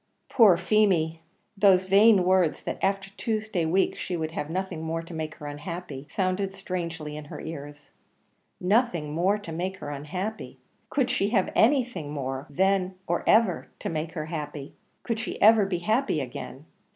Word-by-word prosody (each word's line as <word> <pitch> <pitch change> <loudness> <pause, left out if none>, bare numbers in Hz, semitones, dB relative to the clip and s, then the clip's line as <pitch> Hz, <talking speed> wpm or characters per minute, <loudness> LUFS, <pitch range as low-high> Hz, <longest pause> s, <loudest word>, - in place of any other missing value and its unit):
Poor 210 -8 +6
Feemy! 170 -7 +2 0.3
those 195 -2 +5
vain 200 +1 +6
words 185 -3 +2
that - - -4
"after 195 0 0
Tuesday 215 -6 -1
week 185 +4 +2
she 180 - -4
would 160 -1 -3
have 150 -2 -4
nothing 185 -1 -3
more 165 +1 -3
to 165 - -11
make 155 -1 -4
her 150 - -10
unhappy," 150 -1 -6
sounded 190 0 -1
strangely 170 -5 -5
in 150 0 -7
her - - -8
ears. 145 -2 -8 0.7
Nothing 180 - +1
more 185 +6 +2
to 205 -5 -9
make 185 +4 -3
her 145 -6 -6
unhappy! 180 +10 -5 0.3
Could 260 -3 +1
she 205 -5 +1
have 205 -5 +1
anything 240 - +2
more, 135 -2 -4
then 190 +4 +1
or - - -1
ever, 215 -5 +3
to - - -4
make 160 0 -3
her 155 -3 -4
happy? 150 -3 -6 0.3
Could 230 -2 -2
she 225 - -5
ever 215 -1 +6
be 185 -2 -1
happy 215 - +1
again? 135 +2 -7
180 Hz, 165 wpm, -26 LUFS, 155-200 Hz, 0.7 s, Poor